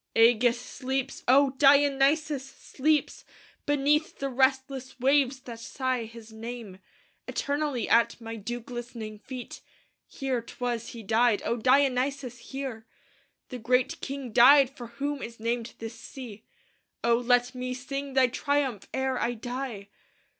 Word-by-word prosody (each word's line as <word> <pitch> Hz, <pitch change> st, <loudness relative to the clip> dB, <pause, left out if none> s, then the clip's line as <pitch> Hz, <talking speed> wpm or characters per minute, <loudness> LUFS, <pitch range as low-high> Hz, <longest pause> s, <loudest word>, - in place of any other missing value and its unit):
"Ægeus 235 Hz, +1 st, +5 dB
sleeps, 260 Hz, +2 st, -4 dB
O 275 Hz, +2 st, +5 dB
Dionysos! 285 Hz, +1 st, +4 dB
sleeps 290 Hz, +2 st, -1 dB, 0.4 s
Beneath 290 Hz, +2 st, +2 dB
the 275 Hz, -, -2 dB
restless 265 Hz, 0 st, 0 dB
waves 270 Hz, 0 st, +3 dB
that 235 Hz, -3 st, -9 dB
sigh 255 Hz, 0 st, -2 dB
his 225 Hz, 0 st, -12 dB
name 225 Hz, -4 st, -8 dB, 0.5 s
Eternally 285 Hz, -5 st, -1 dB
at 230 Hz, +1 st, +3 dB
my 225 Hz, -1 st, -6 dB
dew 240 Hz, +3 st, -5 dB
glistening 230 Hz, -3 st, -7 dB
feet. 255 Hz, +2 st, -8 dB, 0.5 s
Here 265 Hz, -3 st, -2 dB
'twas 235 Hz, 0 st, -4 dB
he 230 Hz, -2 st, -8 dB
died, 225 Hz, +1 st, +2 dB
O 235 Hz, -, +1 dB
Dionysos! 260 Hz, 0 st, +1 dB
here 260 Hz, -5 st, -5 dB, 0.6 s
The 250 Hz, -, -6 dB
great 250 Hz, +3 st, +1 dB
king 275 Hz, -3 st, -5 dB
died 275 Hz, +3 st, +7 dB
for 240 Hz, -3 st, -8 dB
whom 280 Hz, +4 st, -4 dB
is 230 Hz, 0 st, -8 dB
named 230 Hz, +1 st, -2 dB
this 225 Hz, 0 st, -8 dB
sea. 230 Hz, -5 st, -10 dB, 0.6 s
O 235 Hz, 0 st, +4 dB
let 245 Hz, +1 st, +2 dB
me 255 Hz, 0 st, -4 dB
sing 275 Hz, +1 st, -5 dB
thy 265 Hz, -1 st, +6 dB
triumph 265 Hz, -3 st, -1 dB
ere 265 Hz, -1 st, 0 dB
I 240 Hz, +1 st, 0 dB
die! 240 Hz, -3 st, -5 dB
250 Hz, 130 wpm, -28 LUFS, 235-275 Hz, 0.6 s, died